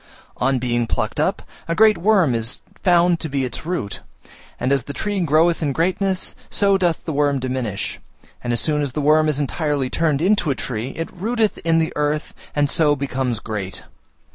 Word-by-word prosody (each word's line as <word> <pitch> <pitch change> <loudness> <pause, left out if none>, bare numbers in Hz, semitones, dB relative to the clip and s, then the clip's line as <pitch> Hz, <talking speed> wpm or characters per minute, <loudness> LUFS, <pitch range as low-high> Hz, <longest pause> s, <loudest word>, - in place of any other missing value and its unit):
On 135 +1 +2
being 120 -1 0
plucked - - -2
up, - - 0 0.2
a 165 - 0
great 215 +1 +6
worm 185 - +3
is 115 0 -1 0.2
found 175 -1 +4
to 160 - -4
be 135 -1 0
its 130 +5 -6
root, 150 - -3 0.6
and 130 +2 0
as 140 -3 +2
the 140 - -5
tree 205 +3 -2
groweth 165 +1 +3
in 145 -3 0
greatness, 185 +4 0
so 200 -1 +3
doth 175 -4 0
the 160 - -2
worm 145 -1 +2
diminish, 125 -6 -3 0.4
and 120 - -1
as 120 - +1
soon 150 -1 +1
as 140 -4 -2
the 150 - -2
worm 155 +2 +4
is 150 -2 0
entirely 145 -2 -1
turned 155 -4 +1
into 195 -4 +2
a 135 - +1
tree 115 -2 -4
it 165 - -4
rooteth 220 +3 0
in 165 0 +2
the 160 -1 +1
earth, 150 +1 -1 0.2
and 145 -1 +3
so 150 0 +2
becomes 130 -3 -2
great. 105 -3 -5
150 Hz, 190 wpm, -21 LUFS, 130-170 Hz, 0.6 s, great